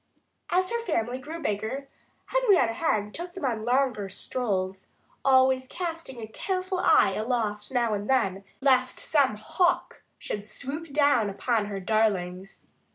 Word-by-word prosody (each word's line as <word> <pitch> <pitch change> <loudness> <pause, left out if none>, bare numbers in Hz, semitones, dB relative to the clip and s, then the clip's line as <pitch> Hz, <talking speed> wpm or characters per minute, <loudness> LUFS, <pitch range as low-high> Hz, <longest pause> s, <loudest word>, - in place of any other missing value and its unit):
As 365 +1 +1
her 470 0 0
family 255 - -1
grew 315 +4 -7
bigger, 220 +5 -2 0.4
Henrietta 410 - +3
Hen 215 -7 0
took 350 +5 -7
them 370 - -4
on 230 -4 -1
longer 245 -5 +1
strolls, 190 -3 -3 0.4
always 260 -1 +4
casting 330 -6 -5
a 225 - -5
careful 370 - -2
eye 195 - +5
aloft 215 -1 -2
now 240 -4 +1
and 205 0 -3
then, 195 -7 +1 0.2
lest 255 -2 +3
some 275 -8 +2
hawk 350 - 0 0.2
should 205 0 -5
swoop 280 +8 -6
down 285 -7 +3
upon 220 +2 0
her 200 -1 -4
darlings. 195 -2 -1
250 Hz, 140 wpm, -27 LUFS, 210-295 Hz, 0.4 s, eye